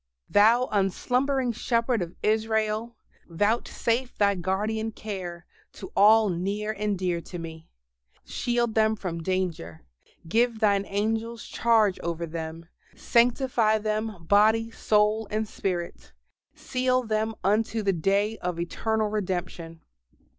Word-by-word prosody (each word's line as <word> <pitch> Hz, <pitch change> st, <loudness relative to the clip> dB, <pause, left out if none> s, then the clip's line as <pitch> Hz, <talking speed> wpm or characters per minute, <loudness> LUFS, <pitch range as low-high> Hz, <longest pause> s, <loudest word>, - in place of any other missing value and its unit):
Thou 225 Hz, +5 st, +5 dB
unslumbering 250 Hz, +7 st, +1 dB
Shepherd 230 Hz, 0 st, 0 dB
of 175 Hz, 0 st, -5 dB
Israel, 220 Hz, +1 st, 0 dB, 0.3 s
vouchsafe 230 Hz, +6 st, -1 dB
Thy 200 Hz, -1 st, +3 dB
guardian 210 Hz, +4 st, -2 dB
care 180 Hz, -6 st, -7 dB, 0.3 s
to 190 Hz, -, -10 dB
all 215 Hz, +1 st, +6 dB
near 200 Hz, +5 st, -2 dB
and 210 Hz, -1 st, -2 dB
dear 175 Hz, -2 st, -1 dB
to 175 Hz, -, -8 dB
me: 160 Hz, -1 st, -9 dB, 0.6 s
shield 240 Hz, -2 st, -1 dB
them 220 Hz, 0 st, +3 dB
from 175 Hz, -5 st, -5 dB
danger: 165 Hz, -, -3 dB, 0.4 s
give 230 Hz, +5 st, +2 dB
Thine 200 Hz, -2 st, +2 dB
angels 225 Hz, +3 st, -2 dB
charge 220 Hz, -5 st, +2 dB
over 170 Hz, 0 st, -3 dB
them; 165 Hz, 0 st, -6 dB, 0.3 s
sanctify 235 Hz, -2 st, +2 dB
them 215 Hz, -3 st, -3 dB
body, 220 Hz, +4 st, +3 dB
soul, 215 Hz, 0 st, +1 dB
and 215 Hz, +1 st, -1 dB
spirit; 175 Hz, -, -4 dB, 0.4 s
seal 255 Hz, 0 st, 0 dB
them 220 Hz, 0 st, -1 dB
unto 215 Hz, +3 st, +1 dB
the 195 Hz, -1 st, +2 dB
day 200 Hz, +6 st, 0 dB
of 180 Hz, -1 st, -3 dB
eternal 220 Hz, +5 st, -1 dB
redemption. 175 Hz, -5 st, -4 dB
210 Hz, 120 wpm, -26 LUFS, 185-225 Hz, 0.6 s, all